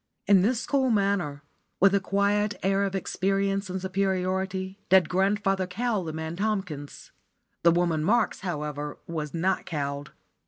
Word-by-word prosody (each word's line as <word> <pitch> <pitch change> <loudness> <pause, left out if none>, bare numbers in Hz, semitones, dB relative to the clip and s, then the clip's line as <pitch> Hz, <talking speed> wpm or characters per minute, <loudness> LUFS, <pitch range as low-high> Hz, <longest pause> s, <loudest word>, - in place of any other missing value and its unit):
In 200 -2 +6
this 235 +4 +1
cool 270 -2 +2
manner, 195 -9 0 0.4
with 195 +1 +5
a 200 - +4
quiet 200 +2 +1
air 195 +1 +2
of 195 -1 -3
experience 195 +1 0
and 185 +1 -3
superiority, 190 0 -1
did 190 -1 +6
grandfather 195 0 +1
cow 215 +2 -1
the 165 -3 -4
man 160 +1 -5
Tomkins. 190 -9 -3 0.5
The 170 - +6
woman 170 -2 +2
Marks, 220 +5 +2
however, 150 -4 -4
was 155 -2 -4
not 185 +3 0
cowed. 140 -2 -3
190 Hz, 145 wpm, -27 LUFS, 170-200 Hz, 0.5 s, In